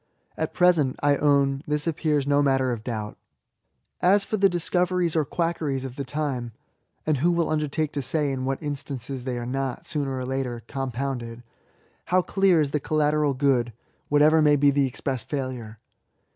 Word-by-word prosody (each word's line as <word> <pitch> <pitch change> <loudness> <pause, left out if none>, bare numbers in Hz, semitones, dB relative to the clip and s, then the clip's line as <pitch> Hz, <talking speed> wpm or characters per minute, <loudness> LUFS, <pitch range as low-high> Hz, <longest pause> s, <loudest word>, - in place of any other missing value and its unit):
At - - -3
present, 165 -7 +3
I 145 0 +4
own, 140 -1 +2
this 150 0 0
appears 150 -3 0
no 145 0 +3
matter 135 -2 +2
of 115 -3 -4
doubt. 110 -3 -5 0.8
As 195 +3 +4
for 215 - -2
the 195 -1 +4
discoveries 175 0 0
or 160 - +3
quackeries 155 -5 -2
of 130 -2 -7
the 140 - -4
time, 130 -4 -3 0.5
(and 155 -2 +1
who 170 +7 +2
will 170 -2 0
undertake 150 0 -1
to 145 - -3
say 145 +2 0
in 130 -1 -3
what 135 +3 -2
instances 135 -3 -5
they 125 -2 -2
are 120 - -4
not, 130 0 -3
sooner 140 -3 -2
or 130 - -3
later, 125 -3 -3
com 135 0 -3
pounded 120 -3 -4 0.3
?) - - -37
how 185 0 +2
clear 195 -3 +3
is 145 -2 -1
the 150 - 0
collateral 150 -1 +1
good, 130 -4 +1 0.4
what* 145 0 +4
ever 155 +1 +5
may 150 -1 +5
be 145 0 +4
the 140 -1 +2
express 130 -1 -3
fSdlure? 125 -5 -5
140 Hz, 185 wpm, -25 LUFS, 130-155 Hz, 0.8 s, ever